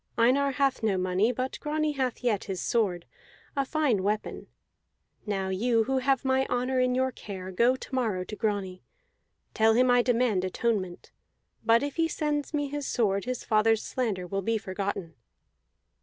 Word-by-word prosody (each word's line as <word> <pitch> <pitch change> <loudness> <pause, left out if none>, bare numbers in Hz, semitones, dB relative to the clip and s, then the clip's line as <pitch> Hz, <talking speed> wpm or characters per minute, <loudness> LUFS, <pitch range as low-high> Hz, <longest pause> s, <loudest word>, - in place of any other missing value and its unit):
Einar 270 +4 +3
hath 270 -1 +1
no 210 -4 +1
money; 185 +5 +1
but 255 +2 -4
Grani 305 0 -1
hath 260 -4 -2
yet 220 -5 0
his 190 -2 -4
sword, 185 -7 0 0.5
a 275 - +2
fine 270 -7 +1
weapon. 210 +2 -2 0.8
Now 195 -2 -1
you 225 +4 +2
who 265 +3 0
have 270 0 +1
my 265 0 +2
honor 250 +1 0
in 250 0 +2
your 260 0 +1
care, 190 -5 -8
go 235 +7 +3
to 260 - -11
morrow 220 -8 0
to 210 - -7
Grani. 200 -4 -2 0.7
Tell 220 0 +4
him 250 +1 +4
I 245 0 +5
demand 235 -6 +1
atonement; 185 -2 -2 0.5
but 230 +3 +4
if 285 +1 -4
he 330 0 +3
sends 295 -2 -2
me 290 -2 -1
his 290 0 -4
sword 200 -5 0
his 255 -1 -3
father's 220 0 +2
slander 215 -8 -2
will 195 +2 -2
be 225 +3 0
forgotten." 195 -3 -4
230 Hz, 170 wpm, -28 LUFS, 200-260 Hz, 0.8 s, I